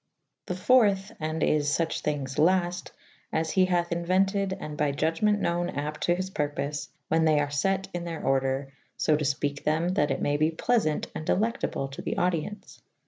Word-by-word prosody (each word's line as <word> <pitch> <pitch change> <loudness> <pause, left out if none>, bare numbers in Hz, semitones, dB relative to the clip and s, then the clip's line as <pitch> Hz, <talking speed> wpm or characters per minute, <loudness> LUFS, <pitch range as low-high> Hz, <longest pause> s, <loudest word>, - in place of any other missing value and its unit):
The 180 - -2
.iiii. 205 +1 +4 0.2
& - - -16 0.2
is 145 -1 +2
luch 165 -1 -1
thynges 140 -3 -2
lafte 175 +1 +2 0.4
as 160 0 0
he 185 -1 +4
hathe 175 -1 0
Inuentid 190 +3 +1
and 150 - -6
by 150 -1 +1
iudgement 165 +8 +1
knowen 175 -1 0
apte 150 +1 -3
to 175 - +2
his 185 +1 -4
purpofe 145 -2 -2 0.2
when 160 0 +3
they 155 -2 +4
ar 145 -1 -1
fet 190 +6 0
in 175 -1 -3
theyr 165 -1 -5
ordre 135 +1 0 0.3
lb 155 -1 +2
to - - -1
Ipeke 145 0 -1
them 155 +3 +1
that 145 -5 +1
it 135 - -1
maye 145 0 +1
be 155 +1 +3
pleasant 165 -2 +1
and - - -5
delectable 210 -7 0
to 135 - -8
the - - -3
audience. 180 +3 -2
160 Hz, 185 wpm, -27 LUFS, 145-185 Hz, 0.4 s, iiii